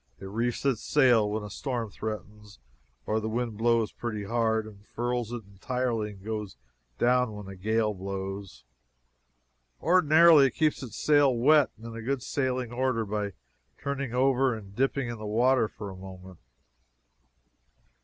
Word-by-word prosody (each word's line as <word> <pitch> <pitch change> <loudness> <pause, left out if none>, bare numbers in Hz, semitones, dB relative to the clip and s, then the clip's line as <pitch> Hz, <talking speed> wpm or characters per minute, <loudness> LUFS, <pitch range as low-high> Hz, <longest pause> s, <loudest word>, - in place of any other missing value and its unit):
It - - -9
reefs 115 +6 -2
its 130 -6 +1
sail 120 -7 +4
when 105 +1 -2
a 105 - -8
storm 120 -6 -3
threatens 105 -1 -7 0.5
or 110 - 0
the 110 0 -3
wind 115 0 -2
blows 115 -1 +2
pretty 110 -3 -4
hard, 110 0 0
and 105 -2 -13
furls 120 +1 -3
it 120 -2 -5
entirely 110 +2 -2
and 95 0 -16
goes 105 - -4 0.4
down 125 -2 +2
when 105 -2 -8
a 95 - -8
gale 110 +3 0
blows. 95 0 -6 1.2
Ordinarily 160 -3 +6
it 130 - -6
keeps 155 -2 +1
its 120 -5 -8
sail 145 -2 +4
wet 140 +4 +4
and 115 0 -9
in 115 - -7
good 135 +1 -2
sailing 130 -2 -1
order 125 -3 0
by 105 -1 -3 0.5
turning 140 -3 -3
over 130 0 +2
and 100 -2 -11
dipping 135 +1 0
it - - -3
in 115 - -9
the 110 - -6
water 120 +2 +3
for 105 -2 -8
a - - -9
moment. 95 -1 -11
115 Hz, 160 wpm, -28 LUFS, 105-130 Hz, 1.2 s, Ordinarily